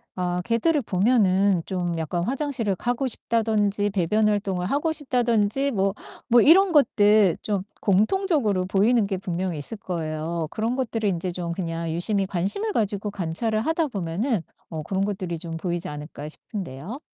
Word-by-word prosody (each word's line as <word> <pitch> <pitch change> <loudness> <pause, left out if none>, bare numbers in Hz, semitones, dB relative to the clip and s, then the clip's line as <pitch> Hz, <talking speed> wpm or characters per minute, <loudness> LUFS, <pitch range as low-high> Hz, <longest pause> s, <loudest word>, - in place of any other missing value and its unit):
아 180 -1 -1
개들을 275 +6 +2
보면은 195 -3 +3
좀 175 -3 -2
약간 170 +2 -2
화장실을 255 -5 -1
가고 245 +6 -1
싶다든지 210 -3 +1
배변 210 +3 +2
활동을 195 -3 -1
하고 295 +6 0
싶다든지 250 -2 +1
뭐, 195 -2 +1 0.4
뭐 240 +1 +6
이런 370 +4 +6
것들 210 - +4
좀 200 -3 -1 0.2
공통적으로 215 - +2
보이는 205 +3 +3
게 190 -2 -2
분명 180 -1 -3
있을 150 +9 -5
거예요. 165 -2 -3
그런 225 +3 -1
것들을 225 -5 -1
인제 180 0 -2
좀 175 -1 -4
그냥 165 -2 -3
유심히 195 +3 0
관심을 200 - -1
가지고 205 -1 -1
관찰을 205 +5 -1
하다 320 +3 0
보면은 195 0 -2 0.3
어 155 -2 -5
'그런 195 +3 -1
것들이 185 -5 -3
좀 165 -1 -5
보이지 175 0 -3
않을까.' 150 0 -7
싶은데요. 185 - -7
200 Hz, 345 characters per minute, -24 LUFS, 175-230 Hz, 0.4 s, 뭐